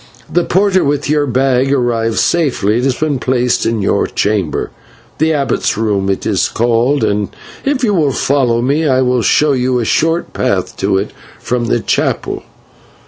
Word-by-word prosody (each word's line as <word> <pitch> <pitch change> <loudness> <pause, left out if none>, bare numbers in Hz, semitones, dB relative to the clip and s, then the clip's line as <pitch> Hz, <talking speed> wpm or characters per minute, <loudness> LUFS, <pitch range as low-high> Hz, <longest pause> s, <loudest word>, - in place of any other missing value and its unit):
The 175 - +3
porter 190 +1 +2
with 145 0 -1
your 150 -1 +1
bag 130 +1 +1
arrived 115 -4 0
safely; 120 - +1
it 125 - -1
has 135 -2 +1
been 150 -2 -1
placed 125 -1 0
in 115 -3 -1
your - - +1
chamber, 100 -6 -1 0.5
the 160 +1 +2
Abbot's 140 -8 0
room 100 -3 0
it 95 - -2
is - - +1
called, 120 +4 +1
and 100 0 0 0.4
if 275 -2 0
you 210 -4 +2
will 155 -7 +2
follow 125 -3 +1
me 150 +5 +1
I 130 -1 +2
will 125 -1 +1
show 150 +6 +3
you 130 -1 +1
a 120 - -1
short 165 +8 0
path - - -1
to 95 - 0
it 100 +2 -3 0.3
from 125 -1 -2
the 115 0 0
chapel." - - -1
130 Hz, 175 wpm, -14 LUFS, 115-145 Hz, 0.5 s, The